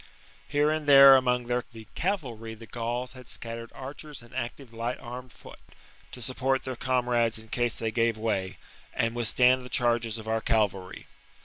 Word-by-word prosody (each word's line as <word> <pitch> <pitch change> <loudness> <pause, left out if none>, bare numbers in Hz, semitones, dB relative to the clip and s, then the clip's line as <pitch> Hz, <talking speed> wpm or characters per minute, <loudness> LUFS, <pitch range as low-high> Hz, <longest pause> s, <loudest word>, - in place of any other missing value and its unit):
Here 150 +1 +2
and 155 -1 -2
there 135 -1 +10
among 125 -2 +2
their 125 +1 0 0.3
cavalry 125 - -3
the 115 +1 -12
Gauls 120 +2 -3
had 130 -2 -12
scattered 115 0 -5
archers 140 0 -8
and 120 - -17
active 125 0 -5
light 115 +2 -3
armed 125 0 -8
foot, - - -14 0.5
to 125 - -8
support 130 +2 0
their 130 -1 -4
comrades 120 -2 +1
in 110 0 -10
case 120 0 0
they 115 -1 -2
gave 115 -1 +1
way, 105 -4 -2 0.4
and 115 0 0
withstand 125 +2 +3
the 125 - -9
charges 120 -2 +1
of 110 0 -9
our 110 0 0
cavalry. 100 -5 -1
120 Hz, 170 wpm, -28 LUFS, 115-130 Hz, 0.5 s, there